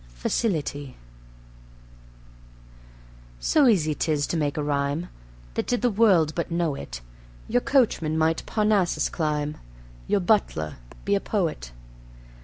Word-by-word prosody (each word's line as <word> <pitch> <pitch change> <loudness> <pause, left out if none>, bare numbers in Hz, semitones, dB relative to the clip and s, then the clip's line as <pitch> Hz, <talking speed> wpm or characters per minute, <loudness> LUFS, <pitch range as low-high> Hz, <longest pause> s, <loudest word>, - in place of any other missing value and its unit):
Facility 145 - -2 2.4
So 290 - +4
easy 165 -9 +3
'tis 150 -1 0
to - - -3
make 150 -3 -1
a 150 - 0
rhyme, 145 +3 -1 0.4
That - - -2
did 245 0 0
the 245 - +3
world 190 -8 +4
but 170 - -3
know 170 -3 0
it, - - -7 0.5
Your 245 +2 +2
coachman 210 - +2
might 160 +1 +1
Parnassus 210 -4 +1
climb, 150 -2 -2 0.5
Your 205 - +2
butler 175 - +1 0.3
be 200 - +1
a 200 - +3
poet. 165 - -2
160 Hz, 120 wpm, -25 LUFS, 145-205 Hz, 2.4 s, So